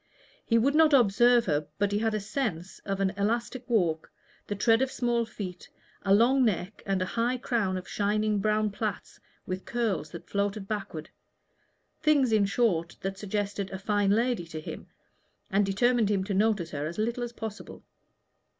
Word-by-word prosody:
He 230 Hz, -, +2 dB
would 265 Hz, +5 st, +3 dB
not 310 Hz, -1 st, +5 dB
observe 240 Hz, 0 st, +5 dB
her, 150 Hz, -3 st, 0 dB
but 205 Hz, 0 st, +1 dB
he 205 Hz, -, +1 dB
had 220 Hz, 0 st, 0 dB
a -, -, 0 dB
sense 200 Hz, -, -3 dB
of 195 Hz, -1 st, -2 dB
an 195 Hz, -1 st, +1 dB
elastic 235 Hz, +4 st, -2 dB
walk, 170 Hz, -9 st, +1 dB, 0.4 s
the 205 Hz, -, -2 dB
tread 225 Hz, +3 st, +3 dB
of 265 Hz, 0 st, 0 dB
small 235 Hz, -2 st, 0 dB
feet, 185 Hz, -5 st, -7 dB, 0.3 s
a 195 Hz, -, -1 dB
long 245 Hz, +6 st, +5 dB
neck 205 Hz, -2 st, -1 dB
and 190 Hz, -1 st, +1 dB
a 185 Hz, -, -6 dB
high 240 Hz, +2 st, +1 dB
crown 220 Hz, -6 st, -1 dB
of 185 Hz, -, -7 dB
shining 210 Hz, 0 st, 0 dB
brown 215 Hz, +1 st, +1 dB
plaits 210 Hz, 0 st, -4 dB, 0.3 s
and 185 Hz, 0 st, -4 dB
curls 205 Hz, -11 st, -1 dB
that 170 Hz, +1 st, -10 dB
floated 200 Hz, 0 st, -2 dB
backward 195 Hz, -7 st, -5 dB, 0.9 s
things, 290 Hz, -5 st, +3 dB
in 215 Hz, -2 st, +4 dB
short, 190 Hz, -6 st, 0 dB
that 195 Hz, 0 st, -4 dB
suggested 205 Hz, -1 st, -3 dB
a 190 Hz, -, -5 dB
fine 205 Hz, 0 st, +1 dB
lady 225 Hz, -3 st, +1 dB
to 160 Hz, -1 st, -6 dB
him, 155 Hz, -, -8 dB, 0.6 s
and 195 Hz, +1 st, +2 dB
determined 235 Hz, +2 st, +2 dB
him 200 Hz, -2 st, +1 dB
to 200 Hz, +1 st, -3 dB
notice 200 Hz, -4 st, +1 dB
her 145 Hz, 0 st, -3 dB
as 170 Hz, -, -7 dB
little 235 Hz, +3 st, -1 dB
as 240 Hz, -1 st, -3 dB
possible. 220 Hz, -3 st, -8 dB
210 Hz, 175 wpm, -28 LUFS, 195-235 Hz, 0.9 s, not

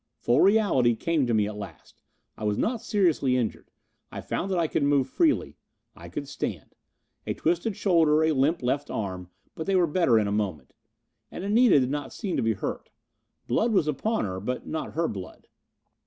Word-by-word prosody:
Full 120 Hz, +4 st, +2 dB
reality 190 Hz, -, +4 dB
came 155 Hz, +1 st, 0 dB
to 120 Hz, -, 0 dB
me 105 Hz, -1 st, +3 dB
at 105 Hz, -, -6 dB
last. 95 Hz, -6 st, -11 dB, 0.3 s
I -, -, -9 dB
was 105 Hz, -1 st, 0 dB
not 230 Hz, -1 st, -1 dB
seriously 170 Hz, -, +1 dB
injured. 120 Hz, -4 st, -3 dB, 0.4 s
I -, -, -6 dB
found 195 Hz, -, -3 dB
that 185 Hz, -, 0 dB
I 170 Hz, -, +2 dB
could 155 Hz, -, -1 dB
move 140 Hz, -2 st, +2 dB
freely. 310 Hz, -, +1 dB, 0.4 s
I -, -, -11 dB
could -, -, -5 dB
stand. -, -, -5 dB, 0.5 s
A -, -, -1 dB
twisted 175 Hz, +6 st, -1 dB
shoulder, 160 Hz, -5 st, +3 dB
a 160 Hz, -, +3 dB
limp 145 Hz, +2 st, +1 dB
left 140 Hz, +4 st, -1 dB
arm, 95 Hz, -4 st, -4 dB, 0.2 s
but 160 Hz, -, -6 dB
they 195 Hz, -, +2 dB
were 180 Hz, -2 st, +4 dB
better 150 Hz, -7 st, +3 dB
in 110 Hz, -, +2 dB
a -, -, -2 dB
moment. 100 Hz, -8 st, -3 dB, 0.6 s
And -, -, -7 dB
Anita 210 Hz, -, +5 dB
did 130 Hz, 0 st, 0 dB
not 145 Hz, 0 st, -4 dB
seem 200 Hz, -6 st, -3 dB
to -, -, +1 dB
be 115 Hz, 0 st, +1 dB
hurt. 95 Hz, -, -5 dB, 0.6 s
Blood 220 Hz, -, +1 dB
was 180 Hz, -6 st, +2 dB
upon 155 Hz, -, -1 dB
her. 95 Hz, -1 st, -4 dB
But 125 Hz, +6 st, -4 dB
not 160 Hz, -, -4 dB
her 165 Hz, +1 st, 0 dB
blood. 95 Hz, -3 st, -8 dB
145 Hz, 195 wpm, -26 LUFS, 115-180 Hz, 0.6 s, Anita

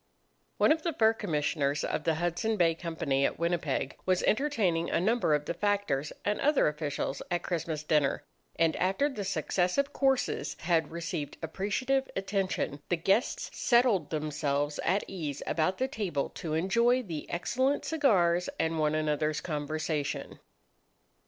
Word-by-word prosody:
* -, -, -44 dB, 0.2 s
One -, -, +4 dB
of 315 Hz, +1 st, +2 dB
the 335 Hz, 0 st, -1 dB
Fur 220 Hz, -3 st, +4 dB
Commissioners 150 Hz, -7 st, -1 dB
of 155 Hz, -, -2 dB
the 165 Hz, -1 st, +2 dB
Hudson 175 Hz, +7 st, -1 dB
Bay 165 Hz, -3 st, +4 dB
Company 160 Hz, -5 st, -1 dB
at -, -, 0 dB
Winnipeg 170 Hz, -5 st, -1 dB
was 185 Hz, -1 st, +1 dB
entertaining 215 Hz, -, +1 dB
a -, -, +1 dB
number 210 Hz, -4 st, +2 dB
of 150 Hz, 0 st, -2 dB
the -, -, -2 dB
factors 200 Hz, -8 st, 0 dB
and 205 Hz, +1 st, 0 dB
other 295 Hz, +1 st, +4 dB
officials 150 Hz, -2 st, -2 dB
at 175 Hz, 0 st, -1 dB
Christmas 165 Hz, -3 st, -2 dB
dinner, 150 Hz, -3 st, +1 dB, 0.3 s
and 165 Hz, -1 st, +2 dB
after 195 Hz, +10 st, +2 dB
the 265 Hz, -8 st, -4 dB
successive 190 Hz, -, 0 dB
courses 270 Hz, -2 st, +1 dB
had 160 Hz, -2 st, +1 dB
received 170 Hz, -3 st, -4 dB
appreciative 230 Hz, -, -1 dB
attention, 195 Hz, -7 st, -1 dB
the 175 Hz, -, +2 dB
guests 195 Hz, +8 st, +1 dB
settled 235 Hz, -, +3 dB
themselves 150 Hz, -1 st, -1 dB
at 200 Hz, +2 st, +1 dB
ease 150 Hz, -7 st, -5 dB
about 170 Hz, +4 st, 0 dB
the 260 Hz, -, 0 dB
table 195 Hz, -, -2 dB
to 155 Hz, -2 st, -4 dB
enjoy 235 Hz, +9 st, +3 dB
the 165 Hz, -8 st, -6 dB
excellent 260 Hz, +10 st, 0 dB
cigars 185 Hz, -, +2 dB
and 160 Hz, 0 st, 0 dB
one 155 Hz, 0 st, +2 dB
another's 155 Hz, 0 st, 0 dB
conversation. 155 Hz, -1 st, -3 dB
170 Hz, 150 wpm, -30 LUFS, 155-210 Hz, 0.3 s, One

